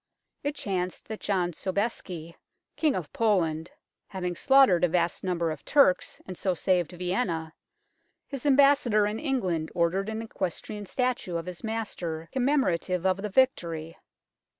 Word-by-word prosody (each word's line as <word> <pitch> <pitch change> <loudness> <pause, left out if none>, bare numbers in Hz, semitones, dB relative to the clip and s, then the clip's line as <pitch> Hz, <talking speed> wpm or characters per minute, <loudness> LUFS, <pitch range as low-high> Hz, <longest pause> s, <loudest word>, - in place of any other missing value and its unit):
It 290 +1 -2
chanced 185 -7 -3
that 220 - -5
John 185 -3 0
Sobeisky, 185 -3 -3 0.4
King 305 -4 +2
of 170 -5 -5
Poland, 175 -7 +1 0.4
having 180 -2 -3
slaughtered 265 -7 +5
a - - +6
vast 170 0 0
number 170 -3 0
of 155 - -7
Turks, 275 -11 +3
and 185 - -7
so 185 0 -1
saved 180 -1 +1
Vienna, 175 -3 -2 0.7
his 275 0 -5
Ambassador 275 -6 +5
in 210 +2 -2
England 185 - -1
ordered 180 +4 +1
an 220 +1 -3
equestrian 205 0 -4
statue 250 -7 -1
of 165 - -5
his 180 +2 -8
master 185 -8 -4
com 265 - 0
memorative 185 - +1
of 190 0 +3
the 210 - -3
victory. 170 -9 +1
185 Hz, 145 wpm, -27 LUFS, 170-225 Hz, 0.7 s, a